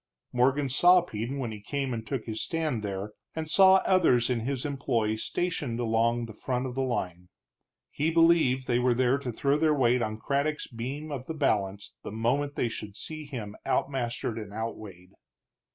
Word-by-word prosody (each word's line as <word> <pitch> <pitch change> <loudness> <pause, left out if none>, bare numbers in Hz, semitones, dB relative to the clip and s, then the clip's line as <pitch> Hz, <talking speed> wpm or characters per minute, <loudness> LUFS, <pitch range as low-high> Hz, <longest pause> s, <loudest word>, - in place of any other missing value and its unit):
Morgan 135 +3 +2
saw 175 +7 +6
Peden 120 -2 -4
when 125 -4 -3
he 105 -1 -8
came 135 +3 -2
and 115 -1 -4
took 130 -2 -3
his 110 -1 -3
stand 155 -8 -1
there, 100 0 -4 0.2
and 160 -1 -3
saw 190 +1 +6
others 130 -11 +3
in 120 - +1
his 130 +3 -3
employ 120 -6 0
stationed 145 -2 -2
along 115 0 +1
the 110 - -9
front 125 +4 -2
of 130 - -4
the 135 - -1
line. 90 -9 -3 0.6
He 155 +3 0
believed 165 -6 +4
they 120 -1 +1
were 125 -1 +2
there 130 +2 +2
to 130 -3 -4
throw 140 +5 +1
their 155 -1 +3
weight 125 -2 +3
on 110 -1 -2
Craddock's 140 +5 -1
beam 135 +6 -6
of 135 -2 -5
the 160 - -4
balance 100 -9 -1
the - - -7
moment 130 +6 0
they - - +1
should 105 -3 -7
see 155 +6 -6
him 115 -7 -6
outmastered 120 -4 -1
and 105 -2 -9
outweighed. 105 -4 -7
125 Hz, 185 wpm, -28 LUFS, 110-145 Hz, 0.6 s, saw